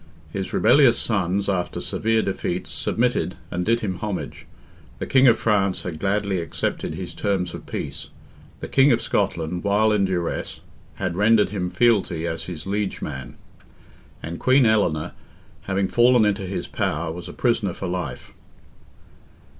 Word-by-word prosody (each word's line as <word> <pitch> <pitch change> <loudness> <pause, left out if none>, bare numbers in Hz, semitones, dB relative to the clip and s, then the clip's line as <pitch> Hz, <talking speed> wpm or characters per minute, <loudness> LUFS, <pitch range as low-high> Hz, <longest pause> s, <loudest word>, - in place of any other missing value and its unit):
His 95 -1 -3
rebellious 120 +2 +5
sons, 100 -2 0
after 95 -3 -1
severe 110 0 0
defeats, 95 -2 -3
submitted, - - 0 0.2
and 90 - -1
did 115 +4 +1
him 95 -4 -2
homage; 105 -2 -5 0.5
the - - -4
King 130 0 +5
of 120 - +6
France 100 -4 +1
had 85 -4 -5
gladly 100 -1 0
accepted 85 - -3
his - - -6
terms 95 -4 -1
of - - -9
peace; 70 -2 -5 0.5
the - - -4
King 140 +1 +5
of 120 - +3
Scotland, 85 -3 -1
while 105 +2 +3
in 105 -2 +3
duress, 90 -3 -3 0.3
had 95 -3 -3
rendered 105 +2 +4
him 90 -3 -2
fealty 100 -8 +2
as 80 -1 -3
his 85 -4 -7
liege 100 0 -2
man; 65 0 -6 0.9
and 85 +1 -5
Queen 130 0 +4
Eleanor, 100 -9 +2 0.5
having 95 0 0
fallen 120 0 +4
into 100 -2 0
his 95 - -3
power, 80 +2 -2
was 85 0 -8
a - - -6
prisoner - - +1
for - - -5
life. 90 -8 -5
100 Hz, 155 wpm, -23 LUFS, 90-110 Hz, 0.9 s, of